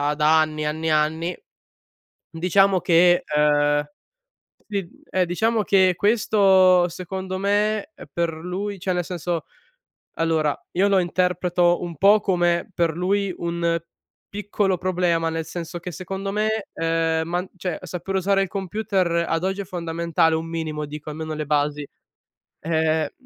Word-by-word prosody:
da 155 +1 +4
anni, 155 -1 -2
anni 160 +2 -2
e - - +2
anni. 155 +3 0 0.9
Diciamo 185 +3 +3
che, 175 +1 +4
uhm, 145 0 +3 0.9
si 200 -4 -3 0.2
eh, 185 -1 +1
diciamo 220 +5 0
che 190 -2 +3
questo, 195 -4 +4
secondo 185 +2 -5
me, 210 +7 0 0.2
per 170 -1 0
lui 185 +4 -5
cioè, 185 +1 -1
nel 175 0 -1
senso 175 -1 -3 0.8
allora 160 -2 +1 0.2
io 195 - +4
lo 200 -2 +3
interpreto 180 -1 +1
un 170 -3 -5
po' 205 +5 +5
come 175 -1 +1
per 170 -3 0
lui 195 +1 0
un 170 0 -1 0.5
piccolo 205 -2 -1
problema. 175 -2 0
Nel 165 0 -3
senso 175 +1 -6
che, 180 +1 -7
secondo 195 +3 -5
me, 215 0 -1
uhm, 165 0 0
man 180 +2 -2
cioè, 180 -2 -3
saper 180 +2 -5
usare 195 +1 +2
il 195 - -2
computer 190 -3 -1
ad 165 0 0
oggi 190 +1 -1
è - - -3
fondamentale, 170 -2 0
un 160 +1 -4
minimo 155 -2 -4
dico, 150 +1 -8
almeno 155 +1 -5
le 155 - -3
basi. 145 0 0 0.7
Eh, 160 -1 0
175 Hz, 140 wpm, -23 LUFS, 165-190 Hz, 0.9 s, po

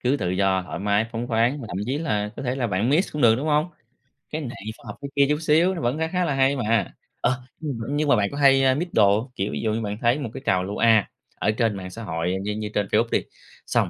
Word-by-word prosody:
cứ 130 +3 +1
tự 90 -10 -2
do, 95 0 +1
thoải 90 - -6
mái, 105 +2 +1
phóng 115 +1 -3
khoáng 120 +5 +1
và - - -7
thậm 90 - -5
chí 135 +4 -1
là 105 -10 -1
có - - -5
thể 125 -1 -1
là 130 -3 -1
bạn 100 +2 0
mix 165 +7 +2
cũng 150 - -2
được, 115 -2 +7
đúng 140 +5 -3
hông? 150 +1 +2 0.6
Cái 155 - -4
này 125 -5 -6 0.2
phải - - -20
học 105 - -6
cái 140 - -5
kia 140 -1 +5
chút 150 0 +1
xíu, 165 +4 +3
nó 165 - -4
vẫn 120 +5 0
khá 160 - 0
khá 180 +2 0
là 150 - 0
hay 135 +1 +3
mà! 115 -6 0 0.3
Ờ, 125 +1 +1 0.2
như 155 -2 -3
m 115 - -5
nhưng 150 0 0
mà 140 - +6
bạn 100 -3 +1
có 140 - -6
hay, 135 -1 +5
a, 130 -1 +5
mix 170 +7 -2
đồ 100 -1 +5
hông? 125 +3 -8
Kiểu, 100 -1 -2
ví - - -3
dụ 110 -1 0
như 115 - -1
bạn 105 -1 -3
thấy 120 +4 +2
một 135 -6 -4
cái 135 - -8
trào 95 -1 +2
lưu 100 +2 -5
A 110 -3 +4 0.3
ở 105 - +1
trên 110 -2 0
mạng 95 -1 -6
xã 115 +5 -8
hội 85 -1 -2
như 105 +1 -2
như 105 0 -4
trên 100 -1 0
Facebook 115 +2 +2
đi, - - +2 0.4
xong - - +1
120 Hz, 300 wpm, -24 LUFS, 105-140 Hz, 0.6 s, được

